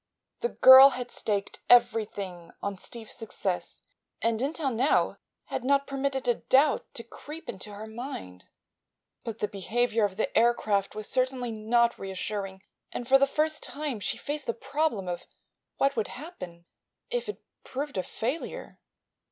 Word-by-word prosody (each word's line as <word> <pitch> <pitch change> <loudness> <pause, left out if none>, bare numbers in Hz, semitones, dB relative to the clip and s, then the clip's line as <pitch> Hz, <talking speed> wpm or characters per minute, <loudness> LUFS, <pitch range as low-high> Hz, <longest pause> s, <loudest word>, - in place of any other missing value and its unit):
The 475 - 0
girl 260 - +10
had 245 -1 -5
staked 200 -2 -2
everything 210 -7 +2
on 200 -2 -3
Steve's 225 0 -7
success 200 -5 -4 0.4
and 230 0 +1
until 280 0 -1
now 250 +5 +2 0.3
had - - -4
not 280 +1 +3
permitted 275 -1 -2
a 240 - +5
doubt 275 +5 +2
to 230 - -5
creep 300 +7 -10
into 210 +1 -6
her 205 +2 -7
mind. 220 - -7 0.8
But 225 -2 -5
the 210 - -1
behavior 225 +3 0
of 200 -2 0
the 220 - -1
aircraft 215 -4 +2
was 215 0 -5
certainly 255 -2 0
not 235 +2 +2
reassuring 195 0 -4 0.3
and 240 - -5
for 270 +1 +6
the 275 - +4
first 310 +2 0
time 290 -6 -4
she - - -2
faced 295 0 -4
the 235 - -1
problem 280 -8 -1
of 175 -1 -4 0.5
what 275 0 +2
would 220 -3 0
happen 180 - -9 0.5
if 485 -3 -2
it 420 - -6 0.2
proved 285 +2 -5
a 185 - +1
failure. 250 - -4
235 Hz, 150 wpm, -28 LUFS, 205-275 Hz, 0.8 s, girl